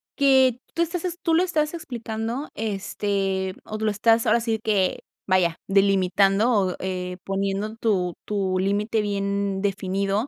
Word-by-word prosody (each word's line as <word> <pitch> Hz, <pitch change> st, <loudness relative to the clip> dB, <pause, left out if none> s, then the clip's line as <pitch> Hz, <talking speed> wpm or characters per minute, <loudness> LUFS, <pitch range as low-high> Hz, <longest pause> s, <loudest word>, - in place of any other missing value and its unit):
que 265 Hz, -3 st, +4 dB
tú 335 Hz, -, -1 dB
estás 340 Hz, +1 st, -1 dB
ex 350 Hz, -1 st, -3 dB
tú 330 Hz, -, +1 dB
lo 345 Hz, -, +4 dB
estás 310 Hz, -4 st, 0 dB
explicando, 235 Hz, -3 st, -4 dB
este, 195 Hz, -2 st, -2 dB
o 215 Hz, -, -5 dB
lo 215 Hz, 0 st, 0 dB
estás 225 Hz, +2 st, +3 dB
ahora 230 Hz, +2 st, +4 dB
sí 225 Hz, -1 st, -1 dB
que, 200 Hz, -4 st, +1 dB, 0.3 s
vaya, 180 Hz, -3 st, +2 dB
delimitando 195 Hz, +2 st, +3 dB
o, 195 Hz, -6 st, +2 dB
eh, 180 Hz, -1 st, -4 dB
poniendo 195 Hz, +2 st, -2 dB
tu 190 Hz, -6 st, 0 dB
tu 195 Hz, -3 st, -1 dB
límite 205 Hz, +4 st, 0 dB
bien 200 Hz, -1 st, -1 dB
definido 195 Hz, +2 st, -1 dB
205 Hz, 145 wpm, -24 LUFS, 195-230 Hz, 0.3 s, que